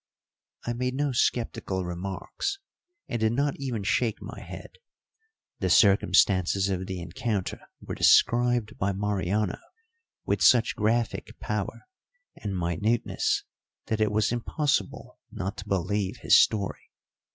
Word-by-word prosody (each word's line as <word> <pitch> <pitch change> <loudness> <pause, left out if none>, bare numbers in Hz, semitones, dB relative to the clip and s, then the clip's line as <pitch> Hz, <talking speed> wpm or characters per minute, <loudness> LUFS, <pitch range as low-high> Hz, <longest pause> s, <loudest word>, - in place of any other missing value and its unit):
I 120 - -1
made 125 +2 -2
no 145 0 0
sceptical 115 -6 -1
remarks, 95 - -4 0.5
and 120 - -3
did 110 +1 +2
not 140 +2 +1
even 125 -7 -3
shake 110 +2 0
my - - -8
head. - - -10 0.8
The - - 0
circumstances 95 -1 +4
of 95 -1 -2
the 95 -2 -4
encounter 95 +4 -3 0.2
were - - -7
described 120 -2 +3
by 100 +1 0
Mariano 100 0 -1 0.7
with - - 0
such 120 -3 +5
graphic 115 +2 -1
power 105 -2 -3 0.5
and 100 -3 -4
minuteness 90 +7 0 0.5
that 110 -1 0
it 105 -1 +2
was 110 +1 +1
impossible 135 +5 -2
not 95 +3 -4
to 100 - -8
believe 100 +1 -1
his - - +5
story. 100 -3 +2
105 Hz, 125 wpm, -27 LUFS, 95-120 Hz, 0.8 s, such